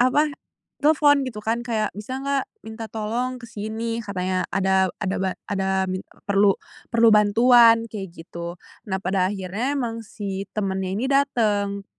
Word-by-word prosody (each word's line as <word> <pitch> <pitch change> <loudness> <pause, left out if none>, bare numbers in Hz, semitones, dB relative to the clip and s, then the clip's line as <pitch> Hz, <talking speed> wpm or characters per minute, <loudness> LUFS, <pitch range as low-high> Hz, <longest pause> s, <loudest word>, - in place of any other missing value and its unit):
apa, 255 +4 +4 0.6
telepon 290 -1 +4
gitu 215 -3 -7
kan 230 +2 0
kayak, 220 -3 -1
"Bisa 235 +5 -5
enggak 275 -1 0 0.2
minta 220 0 -7
tolong 235 +4 -2
ke 235 - -10
sini," 225 +2 -4
katanya, 185 -2 -1
"Ada 190 0 +3
ada 190 -1 -1
ba 190 - +1 0.2
ada 190 -1 +1
minta 185 0 -4 0.2
perlu, 200 0 +3 0.4
perlu 230 0 +5
bantuan." 230 +2 +6
Kayak 200 -3 -5 0.2
gitu. 170 0 -7 0.3
Nah 190 - 0
pada 185 0 +1
akhirnya 205 +9 -2
emang 230 -3 -2
si 195 -2 -5
temannya 190 -2 -1
ini 230 - -1
datang 210 -8 +1
210 Hz, 150 wpm, -23 LUFS, 190-235 Hz, 0.6 s, bantuan